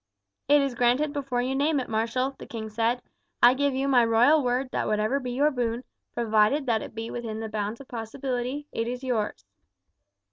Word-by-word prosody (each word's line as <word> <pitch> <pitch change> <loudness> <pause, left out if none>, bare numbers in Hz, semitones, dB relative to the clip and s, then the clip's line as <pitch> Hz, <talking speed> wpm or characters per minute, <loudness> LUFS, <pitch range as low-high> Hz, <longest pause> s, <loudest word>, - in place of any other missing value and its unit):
"It 290 +1 +6
is 275 -2 -1
granted 250 +5 +2
before 270 -4 -1
you 260 +1 -1
name 285 +2 +2
it, 255 - -4
marshal," 230 +5 -1
the - - -9
king 220 -2 -6
said. 230 +3 0 0.4
"I 240 +1 +9
give 280 0 0
you 270 +1 0
my 255 -3 +5
royal 240 +7 +5
word 250 +1 0
that - - -1
whatever 215 +6 +1
be 255 -2 -5
your 285 +5 +2
boon, 240 -2 -2 0.3
provided 225 +5 +2
that 225 -4 +1
it - - -9
be 225 0 -5
within 225 -2 -5
the 220 0 -4
bounds 215 +1 -3
of 275 - -13
possibility, 250 +4 -4
it 230 - -2
is 250 +2 -4
yours." 215 - -2
245 Hz, 200 wpm, -26 LUFS, 225-270 Hz, 0.4 s, I